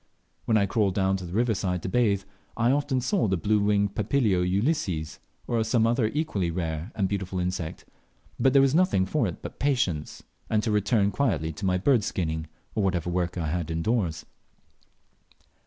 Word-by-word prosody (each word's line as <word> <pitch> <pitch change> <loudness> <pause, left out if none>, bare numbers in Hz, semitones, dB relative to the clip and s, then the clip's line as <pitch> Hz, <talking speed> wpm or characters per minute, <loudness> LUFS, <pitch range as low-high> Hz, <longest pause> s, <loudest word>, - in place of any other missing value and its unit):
When 110 - +3
I 100 - +3
crawled 100 -1 +1
down 95 -1 +2
to 90 -2 -7
the 85 - -8
river 115 +2 +2
side 90 -3 -2
to - - -3
bathe, 100 -2 +2 0.3
I 120 +2 +3
often 140 -2 +1
saw 185 - +1
the 95 -1 +1
blue 105 +6 +1
winged 100 -1 +1
Papilio 105 -3 +1
ulysses, 95 - -1 0.3
or 115 -2 0
some 115 0 +2
other 115 0 +2
equally 110 - -1
rare 80 +2 -3
and 100 -2 +1
beautiful 95 -2 -3
insect; 90 -2 -3 0.5
but 135 - +4
there 135 0 +6
was 135 0 +3
nothing 170 - +3
for 95 - 0
it - - -7
but - - -8
patience, 120 - -1 0.3
and 110 -1 +1
to 110 - 0
return 105 0 +2
quietly 90 - 0
to 95 +6 -3
my 90 0 +2
bird 120 +3 +3
skinning, 80 -4 -2 0.3
or - - 0
whatever 90 -3 0
other - - -3
work 90 0 -1
I 80 -3 -2
had 85 0 -2
indoors. 85 +1 -1
100 Hz, 190 wpm, -26 LUFS, 90-115 Hz, 0.5 s, there